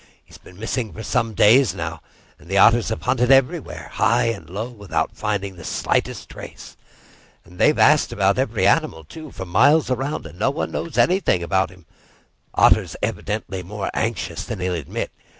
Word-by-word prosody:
"He's - - -16
been 90 - -16
missing 115 +1 -3
for 110 - -8
some 115 -4 -1
days 110 -1 +5
now, 80 -2 -5 0.4
and 80 - -17
the 95 - 0
Otters 115 +2 +5
have 110 - -4
hunted 125 -1 +1
everywhere, 135 -1 +1
high - - +2
and 115 -6 -6
low, 105 +6 -4
without 105 -6 -3
finding 100 -3 -3
the 85 - -11
slightest - - -2
trace. - - -11 0.7
And 90 +1 -16
they've - - +4
asked - - +4
every - - +1
animal, 80 0 +1
too, 155 - -11
for 95 -7 -7
miles 140 - +3
around, 135 - -2
and 85 +3 -11
no - - +2
one 140 - -3
knows 170 - -5
anything 180 - +2
about 95 +3 +1
him. 90 -2 -18 0.7
Otter's - - +4
evidently 105 -3 -3
more 100 +2 -5
anxious 115 0 -2
than 110 -5 -6
he'll 90 0 -1
admit. 80 -6 -4
105 Hz, 170 wpm, -21 LUFS, 90-125 Hz, 0.7 s, days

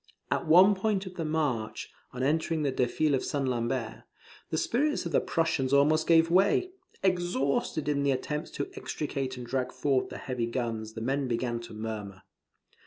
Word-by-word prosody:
At - - 0
one 185 +6 +7
point 200 0 -1
of 185 - -8
the 165 -3 -4
march, 145 -8 -2 0.2
on 125 0 -4
entering 160 +2 +1
the 140 - +1
defile 130 +4 +1
of 135 - +1
St. 140 -2 -1
Lambert, 120 -1 -2 0.5
the 160 - -1
spirits 280 - 0
of 170 - -3
the - - +3
Prussians 140 -5 0
almost 150 +3 +4
gave 165 0 +5
way. 200 - +3 0.3
Exhausted 175 -5 0
in 145 -1 +1
the 140 - +1
attempts 150 +4 -2
to 140 - -5
extricate 135 -3 -4
and 125 - -6
drag 130 0 -2
forward 130 0 0
the - - -7
heavy 125 -3 -3
guns, 115 -3 -3
the 110 - -6
men 135 +3 0
began 120 0 -1
to 115 -2 -10
murmur. 105 -3 -6
140 Hz, 175 wpm, -29 LUFS, 125-165 Hz, 0.5 s, one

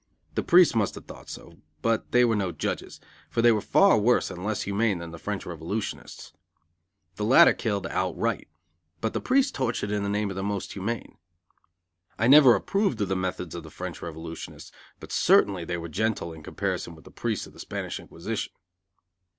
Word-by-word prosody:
The - - 0
priests 175 0 +6
must 110 -4 0
have - - -10
thought - - -12
so, - - -10 0.2
but 115 -1 0
they 125 0 +5
were 115 -2 +2
no 95 -3 -1
judges, 80 - -4 0.3
for 115 - 0
they 120 - +7
were 110 -2 +1
far 195 - +5
worse 120 +4 +2
and 90 - -7
less 110 +1 -1
humane 100 0 0
than 85 -1 -7
the 85 - -9
French 105 +1 -4
revolutionists. 90 +5 -5 0.8
The 105 - -3
latter 120 +5 +7
killed 100 -4 -2
outright, - - -1 0.5
but 110 - -2
the - - -2
priests 270 +1 +2
tortured 120 -6 -2
in 105 -1 0
the 100 - -2
name 105 0 -1
of - - -6
the 95 - -3
Most 100 0 -3
Humane. 110 +4 -5 1.0
I 110 - +1
never 135 -1 +8
approved 195 - 0
of 100 - 0
the 95 - +1
methods 90 -2 -3
of 85 - -5
the 80 - -11
French 90 -3 -7
revolutionists, 80 0 -8 0.3
but - - -11
certainly 95 -4 +3
they 85 +1 -3
were 85 0 -6
gentle 95 -1 -2
in 80 - -11
comparison 80 +2 -3
with 80 - -17
the - - -13
priests - - -3
of - - -15
the - - -16
Spanish - - -5
Inquisition. 105 +6 -5
100 Hz, 190 wpm, -26 LUFS, 90-115 Hz, 1.0 s, never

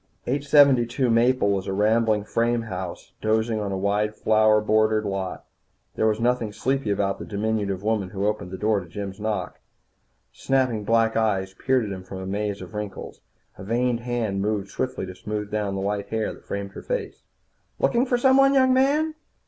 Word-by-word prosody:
872 135 -3 +3
Maple 115 -2 +3
was 95 0 -1
a 95 - -2
rambling 110 +1 +2
frame 115 +2 0
house 95 -5 -7
dozing 110 +1 +1
on 100 -2 -3
a 95 - -2
wide 105 +2 0
flower 110 0 +4
bordered 110 0 +2
lot. 95 -2 -4 0.5
There 110 - +1
was 110 0 +1
nothing 120 -2 +1
sleepy 135 +2 -1
about 100 -1 0
the - - -6
diminutive 100 -2 -2
woman 105 -3 0
who 100 0 -3
opened 105 -4 -1
the 95 - -6
door 105 0 +1
to 90 - -10
Jim's 95 +3 -6
knock. 105 -4 -3 0.7
Snapping 130 -6 0
black 115 +1 +2
eyes 95 -4 0
peered 130 +3 +1
at 100 - -5
him 95 -1 -5
from 95 +1 -8
a 95 - -6
maze 100 +1 -3
of - - -12
wrinkles. 105 -2 -6 0.4
A - - -7
veined 120 +3 0
hand 120 -5 -2
moved 100 -1 -2
swiftly 130 -7 -3
to 95 - -8
smooth 105 +2 -5
down 105 -2 -1
the 95 - -3
white 100 0 -2
hair 110 -1 -1
that - - -17
framed 100 0 -4
her - - -9
face. - - -4 0.6
"Looking 240 +3 +2
for 245 - +2
someone, 270 +2 +5
young 260 -1 +5
man?" 290 +5 +2
110 Hz, 185 wpm, -24 LUFS, 100-120 Hz, 0.7 s, someone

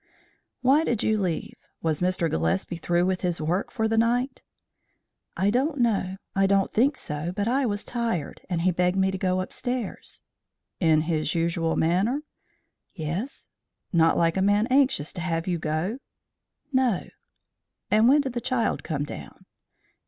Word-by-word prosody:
"Why 275 +5 +5
did 235 -8 -1
you 215 -1 +2
leave? 175 -4 -2 0.3
Was 160 -1 0
Mr. 180 -2 +1
Gillespie 85 - -1
through 175 +1 +1
with 185 0 0
his 175 -2 -1
work 170 +5 -1
for 220 -3 -1
the 225 0 +2
night?" 245 +3 +1 1.0
"I 200 +2 +2
don't 280 +6 +1
know; 200 -6 +1 0.2
I 195 0 +4
don't 195 -1 +2
think 265 +5 +3
so, 150 +3 -4
but 205 +1 -1
I 260 +2 +2
was 205 -1 -2
tired, 230 - -3
and 175 -2 0
he 185 +2 +3
begged 180 +2 +1
me 190 0 +3
to 190 - -3
go 185 0 +1
upstairs." 245 +3 -5 0.6
"In 160 -3 +4
his 155 -1 -1
usual 165 -1 0
manner?" 195 - +1 0.7
"Yes." 175 - -4 0.4
"Not 165 -1 +4
like 165 +1 +2
a - - +2
man 205 +2 +3
anxious 260 - +2
to 175 - -5
have 165 -1 -1
you 175 -2 -1
go?" 160 - -2 0.7
"No." 255 -7 +2 0.8
"And 215 +3 +5
when 290 +2 +6
did 265 -3 -4
the 240 - -2
child 235 -3 0
come 145 -4 -2
down?" 145 - -9
190 Hz, 160 wpm, -26 LUFS, 165-235 Hz, 1.0 s, when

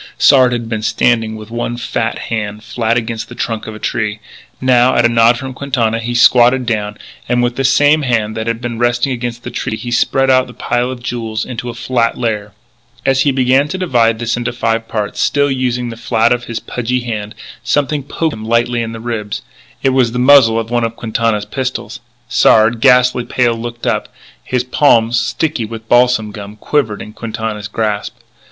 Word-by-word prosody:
Sard 130 -3 +5
had 120 -2 -3
been 110 -1 -3
standing 115 -1 +1
with 110 0 -10
one 120 0 -3
fat 115 -1 -2 0.2
hand 105 -1 -3
flat 115 +1 -1
against 115 -1 -4
the - - -10
trunk 115 -2 -3
of 110 - -7
a - - -7
tree. 105 0 -2 0.4
Now, 130 0 +3
at 120 - +3
a - - +7
nod 115 0 +4
from 130 +1 -6
Quintana, 120 -5 -1
he 120 +1 -4
squatted 125 +1 +5
down, 105 -2 -2 0.3
and, 120 0 +2
with 120 0 0
the 135 - -1
same 145 +3 +4
hand 115 -5 0
that 110 +1 -4
had 115 0 -2
been 120 -2 -4
resting 120 +2 +1
against 120 -1 -4
the - - -6
tree, 110 - -3
he 120 - -6
spread 135 +2 +2
out 130 0 +3
the 125 - -13
pile 120 +1 -1
of 125 -2 -7
jewels 115 -3 -3
into 125 -1 -5
a 115 - -7
flat 120 -1 0
layer. 105 -4 -2 0.5
As 135 0 +3
he 140 - +3
began 130 +2 +2
to 170 - -4
divide 120 -11 +2
this 120 +1 -1
into 120 0 -2
five 115 -1 -1
parts, 105 -2 -3
still 145 -1 +2
using 125 -2 -1
the 115 - -7
flat 115 0 +1
of 120 0 0
his 115 - -4
pudgy 125 +1 -2
hand, 110 -3 -5 0.3
something 145 +3 0
poked 155 +3 -2
him 110 - -8
lightly 115 +1 +1
in 115 0 -4
the 115 - -7
ribs. 110 -3 -4 0.4
It 135 - +4
was 130 -3 +2
the - - -2
muzzle 125 -3 +6
of 115 +1 -5
one 120 -1 +1
of 115 0 -2
Quintana's 110 -2 -1
pistols. 125 -1 -4 0.3
Sard, 115 -1 +4
ghastly 125 -2 +4
pale, 120 0 +1
looked 120 +1 -6
up. - - -1 0.3
His 125 -1 -1
palm, 120 -3 +3
sticky 120 +2 -1
with 110 0 -9
balsam 120 -3 +3
gum, 105 0 -9
quivered 110 -2 -1
in 105 - -11
Quintana's 110 -2 -5
grasp. 105 +1 -2
120 Hz, 200 wpm, -15 LUFS, 110-125 Hz, 0.5 s, a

